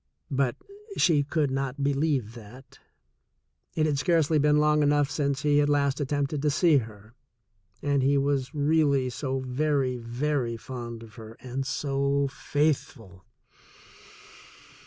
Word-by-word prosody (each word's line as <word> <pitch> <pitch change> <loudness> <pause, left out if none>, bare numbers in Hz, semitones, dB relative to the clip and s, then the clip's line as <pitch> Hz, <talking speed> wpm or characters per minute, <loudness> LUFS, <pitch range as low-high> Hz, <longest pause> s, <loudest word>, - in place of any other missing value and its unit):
But 135 -3 +1 0.4
she 160 -5 +4
could 145 -1 -1
not 135 0 -2
believe 140 -5 0
that. 120 +3 -14 1.0
It 155 - +2
had 145 -3 0
scarcely 160 0 +2
been 150 +1 +3
long 150 0 +3
enough 145 -1 +2
since 140 -2 -1
he 145 -1 +3
had 145 0 +2
last 140 -1 +1
at 140 - -1
tempted 145 0 -1
to 150 - +2
see 155 +1 +4
her, 110 -2 -6 0.7
and 140 -1 +1
he 140 +2 +3
was 140 -2 0
really 145 -3 +2
so 130 +1 -3
very, 130 0 0
very 120 +1 -2
fond 120 -1 -7
of 110 -1 -14
her 110 +1 -11
and 130 +1 -4
so 140 0 0
faithful. 135 - -2
140 Hz, 135 wpm, -27 LUFS, 130-145 Hz, 1.0 s, she